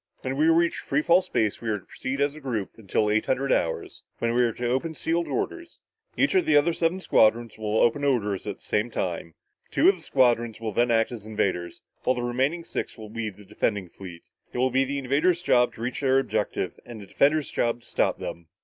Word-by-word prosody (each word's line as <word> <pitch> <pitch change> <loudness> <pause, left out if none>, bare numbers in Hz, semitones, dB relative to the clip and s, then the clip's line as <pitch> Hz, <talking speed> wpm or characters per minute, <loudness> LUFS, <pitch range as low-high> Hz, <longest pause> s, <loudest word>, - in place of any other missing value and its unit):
When 130 +1 -2
we 155 +3 +3
reach 170 +1 +3
free 145 +2 -1
fall 175 +3 +5
space, 110 - -1
we 115 - -3
are 105 - +1
to 95 - -15
proceed 135 +2 -4
as 145 0 +2
a 155 - -10
group 120 -9 -3
until 105 0 -1
eight 110 +1 +1
hundred 135 +1 0
hours, 80 - -1 0.2
when 115 0 0
we 125 - +3
are 120 -1 +3
to 120 +2 -3
open 135 +7 -1
sealed 170 +3 -1
orders. 350 -4 -4 0.4
Each - - +3
of 375 -2 +2
the 150 - +5
other 160 +4 +3
seven 165 +3 0
squadrons 115 - +3
will 110 0 -1
open 120 +5 +3
their 145 - +2
orders 105 -7 -1
at 100 - -3
the - - -28
same 105 +3 0
time. 85 -6 -4 0.3
Two - - +4
of 195 - +3
the - - -15
squadrons 120 -6 +2
will 110 -1 -3
then 120 +4 +2
act 115 0 +2
as 110 -3 -8
invaders 95 -5 -2 0.2
while 130 - +1
the 120 - -3
remaining 135 +8 0
six - - -5
will 110 -1 -9
be 115 0 -3
the 105 0 -15
defending 100 -2 -2
fleet. 90 -3 -11 0.3
It - - -6
will 130 +1 +2
be 135 +2 +3
the 140 +1 -3
invaders' 150 +7 +1
job 125 -8 +3
to 115 - -10
reach 120 +3 -3
their 135 -1 +3
objective 135 - -1
and 120 -2 -9
the 100 - -9
defenders' 145 +8 +2
job 120 0 0
to 120 - -17
stop - - +1
them." 85 -1 -7
120 Hz, 235 wpm, -26 LUFS, 110-145 Hz, 0.4 s, fall